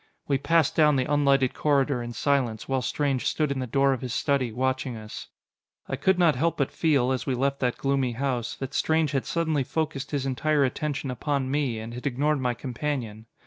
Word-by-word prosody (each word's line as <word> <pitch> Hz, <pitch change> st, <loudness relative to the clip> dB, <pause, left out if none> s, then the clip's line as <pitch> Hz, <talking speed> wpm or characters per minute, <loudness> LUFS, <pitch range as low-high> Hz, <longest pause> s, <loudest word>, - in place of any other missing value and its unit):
We 140 Hz, -2 st, +1 dB
passed 165 Hz, 0 st, +2 dB
down 150 Hz, -2 st, +5 dB
the 130 Hz, -1 st, +1 dB
unlighted 140 Hz, -2 st, +2 dB
corridor 140 Hz, -3 st, +1 dB
in 120 Hz, 0 st, -6 dB
silence, 125 Hz, -3 st, 0 dB
while 135 Hz, -1 st, 0 dB
Strange 135 Hz, +2 st, -1 dB
stood 150 Hz, -2 st, 0 dB
in 135 Hz, -, -2 dB
the 130 Hz, -, -3 dB
door 135 Hz, +3 st, +3 dB
of 130 Hz, -, -4 dB
his 125 Hz, -1 st, -4 dB
study, 135 Hz, -4 st, +1 dB
watching 130 Hz, 0 st, -1 dB
us. 110 Hz, 0 st, -8 dB, 0.6 s
I -, -, -2 dB
could 185 Hz, +7 st, +2 dB
not 170 Hz, -4 st, +4 dB
help 165 Hz, +1 st, 0 dB
but 140 Hz, -, 0 dB
feel, 140 Hz, -6 st, +2 dB
as 130 Hz, +1 st, -2 dB
we 130 Hz, -, +1 dB
left 140 Hz, +2 st, 0 dB
that 125 Hz, -2 st, 0 dB
gloomy 135 Hz, -3 st, 0 dB
house, 125 Hz, -2 st, -2 dB
that 135 Hz, -1 st, -6 dB
Strange 160 Hz, -2 st, +1 dB
had 135 Hz, -3 st, -1 dB
suddenly 160 Hz, -4 st, 0 dB
focused 145 Hz, -1 st, -3 dB
his 140 Hz, -3 st, -2 dB
entire 145 Hz, +2 st, +1 dB
attention 140 Hz, +1 st, -3 dB
upon 135 Hz, +1 st, -2 dB
me, 140 Hz, -5 st, 0 dB
and 110 Hz, +1 st, -7 dB
had 125 Hz, +4 st, -4 dB
ignored 140 Hz, +2 st, 0 dB
my 125 Hz, -1 st, 0 dB
companion. 120 Hz, -4 st, -4 dB
135 Hz, 205 wpm, -26 LUFS, 125-145 Hz, 0.6 s, down